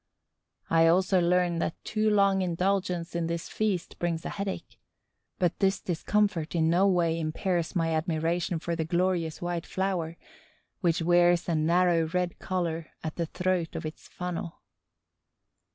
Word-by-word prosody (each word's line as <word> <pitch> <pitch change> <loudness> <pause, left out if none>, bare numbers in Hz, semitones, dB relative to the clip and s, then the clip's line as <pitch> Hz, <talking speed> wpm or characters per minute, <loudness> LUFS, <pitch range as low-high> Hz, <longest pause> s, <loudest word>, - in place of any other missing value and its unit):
I 165 0 +5
also 185 +2 +3
learn 175 -1 +2
that 165 - -1
too 215 0 +1
long 200 -2 +3
indulgence 180 -1 -1
in 170 -1 0
this 170 0 -3
feast 205 -5 -2
brings 170 -1 -2
a - - -2
headache; 200 -1 -5 0.6
but 175 -3 0
this 195 -1 +2
discomfort 175 -1 0
in 160 -1 +3
no 185 +3 +4
way 170 -3 +2
impairs 165 +2 -1
my 165 -2 +1
admiration 165 +2 0
for 170 +1 -3
the 165 - -1
glorious 175 -1 0
white 175 -1 -3
flower, 180 -4 -2 0.6
which 170 -3 +1
wears 175 0 +4
a 170 - +1
narrow 165 +1 +3
red 180 +1 -2
collar 170 -3 -2 0.2
at 155 -1 -4
the 170 -2 -1
throat 180 -1 -1
of - - -4
its 155 - -7
funnel. 180 -2 -5
175 Hz, 150 wpm, -28 LUFS, 165-185 Hz, 0.6 s, I